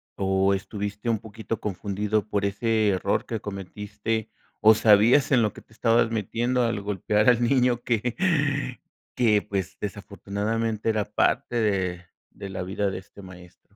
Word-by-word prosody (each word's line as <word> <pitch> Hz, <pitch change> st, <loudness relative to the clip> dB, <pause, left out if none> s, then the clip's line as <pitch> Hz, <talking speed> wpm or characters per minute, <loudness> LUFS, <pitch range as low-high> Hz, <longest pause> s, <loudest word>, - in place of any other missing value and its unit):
o 95 Hz, 0 st, +2 dB
estuviste 105 Hz, +2 st, -5 dB
un 110 Hz, -3 st, +1 dB
poquito 110 Hz, 0 st, -6 dB
confundido 105 Hz, +2 st, -2 dB
por 100 Hz, -1 st, -1 dB
ese 110 Hz, +1 st, +1 dB
error 95 Hz, +1 st, 0 dB
que 115 Hz, -2 st, -4 dB
cometiste 105 Hz, +3 st, -4 dB, 0.3 s
o 110 Hz, +1 st, +7 dB
sabías 110 Hz, +7 st, +5 dB
en 125 Hz, -3 st, +5 dB
lo 105 Hz, -, 0 dB
que -, -, -12 dB
te 110 Hz, -, -24 dB
estabas 115 Hz, 0 st, +2 dB
metiendo 120 Hz, +4 st, 0 dB
al 115 Hz, -3 st, -1 dB
golpear 105 Hz, +3 st, +1 dB
al 120 Hz, 0 st, +3 dB
niño 125 Hz, -1 st, +2 dB
que 120 Hz, 0 st, -1 dB, 1.0 s
que 110 Hz, -4 st, +3 dB
pues, 95 Hz, -3 st, -4 dB
desafortunadamente 105 Hz, +2 st, -3 dB
era 110 Hz, -2 st, +1 dB
parte 120 Hz, -, 0 dB
de 95 Hz, -5 st, 0 dB, 0.3 s
de 100 Hz, -, -8 dB
la 95 Hz, -, -4 dB
vida 95 Hz, +2 st, -1 dB
de 95 Hz, -, -4 dB
este 100 Hz, +1 st, -15 dB
maestro? 90 Hz, +1 st, -15 dB
105 Hz, 155 wpm, -25 LUFS, 100-115 Hz, 1.0 s, o